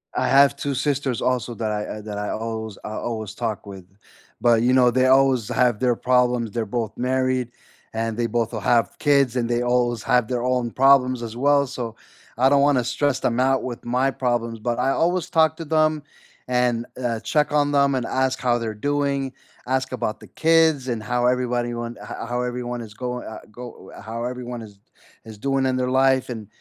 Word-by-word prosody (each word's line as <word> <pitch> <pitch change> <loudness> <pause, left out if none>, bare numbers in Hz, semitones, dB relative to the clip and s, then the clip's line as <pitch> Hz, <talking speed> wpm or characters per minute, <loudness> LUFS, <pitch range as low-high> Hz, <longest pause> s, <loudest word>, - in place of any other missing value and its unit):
I - - +1
have 140 0 +5
2 140 0 -3
sisters 135 -2 -1
also 125 -2 0
that 110 -2 -2
I 105 0 -4
I - - -8
that 105 -1 -6
I 105 0 -3
always 110 -2 -4
I 110 - -6
always 110 -3 -4
talk 110 -3 -3
with, 95 -3 -10 0.6
but, 115 -1 +4
you 125 - +3
know, 125 -1 +5
they 130 +2 +2
always 130 -3 +3
have 120 -3 +2
their 125 -2 +2
problems, 125 -3 +1
they're 115 0 -2
both 110 0 -3
married, 130 -1 0 0.4
and 115 0 -2
they 120 - 0
both 115 0 -1
will 110 - -2
have 115 -4 +1
kids, 140 -4 +3
and 120 -2 0
they 120 0 +1
always 120 -2 +1
have 125 -3 +2
their 125 -1 -2
own 125 -2 0
problems 130 -1 +4
as 115 0 -6
well, 140 +1 +3
so 120 -3 -5 0.4
I 130 +2 +4
don't 140 0 +4
wanna 140 -3 +3
stress 130 +3 0
them 120 +1 0
out 135 +1 +2
with 120 -2 -6
my 125 +3 +1
problems, 120 -3 -2
but 120 +1 -2
I 135 - +2
always 175 +2 0
talk 160 -2 +3
to 165 - -6
them, 155 -1 +1 0.4
and, 125 -1 +1 0.2
uh, 115 -2 -1
check 150 +5 0
on 145 -1 +2
them, 140 -1 +3
and 125 - -1
ask 130 0 0
how 120 -2 +1
they're 115 -2 -3
doing, 140 +2 -1 0.3
ask 130 +1 -1
about 110 -3 -3
the - - -12
kids, 160 -4 +3
and 115 -4 -3
how 125 +2 0
everybody 125 -1 0
want 120 0 -5
ho 105 - -7
how 120 +1 -2
everyone 125 -1 -4
is 110 -2 -10
going, 125 -1 -5
uh 110 - -7
go 120 -3 -11
uh, - - -11
how 115 +3 -5
everyone 125 -1 -5
is 100 -2 -14 0.5
is 110 -1 -10
doing 135 +3 0
in 130 - 0
their 125 0 -1
life, 130 0 +3
and 110 -4 -6
125 Hz, 210 wpm, -23 LUFS, 115-130 Hz, 0.6 s, have